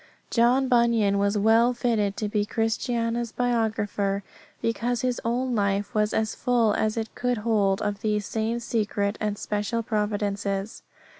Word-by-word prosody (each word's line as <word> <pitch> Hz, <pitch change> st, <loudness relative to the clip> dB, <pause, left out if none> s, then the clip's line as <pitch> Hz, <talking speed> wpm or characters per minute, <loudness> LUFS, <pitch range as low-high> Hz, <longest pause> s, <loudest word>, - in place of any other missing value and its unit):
John 250 Hz, +3 st, +3 dB
Bunyan 235 Hz, -5 st, +3 dB
was 200 Hz, +1 st, +1 dB
well 225 Hz, +4 st, +4 dB
fitted 220 Hz, -5 st, 0 dB
to 215 Hz, -, -1 dB
be 205 Hz, 0 st, 0 dB
Christiana's 230 Hz, +1 st, -1 dB
biographer, 215 Hz, -5 st, 0 dB, 0.4 s
because 235 Hz, +1 st, -1 dB
his 250 Hz, -1 st, -1 dB
own 245 Hz, +2 st, 0 dB
life 200 Hz, -1 st, 0 dB
was 210 Hz, 0 st, +1 dB
as 220 Hz, 0 st, 0 dB
full 235 Hz, -4 st, +2 dB
as 215 Hz, +2 st, 0 dB
it 225 Hz, 0 st, -3 dB
could 245 Hz, -1 st, -1 dB
hold 210 Hz, -3 st, +1 dB
of 205 Hz, -1 st, -2 dB
these 210 Hz, -2 st, 0 dB
same 225 Hz, +2 st, -1 dB
secret 210 Hz, -3 st, -1 dB
and 210 Hz, -1 st, -1 dB
special 210 Hz, +3 st, -2 dB
providences. 205 Hz, -2 st, -2 dB
220 Hz, 145 wpm, -25 LUFS, 205-235 Hz, 0.4 s, well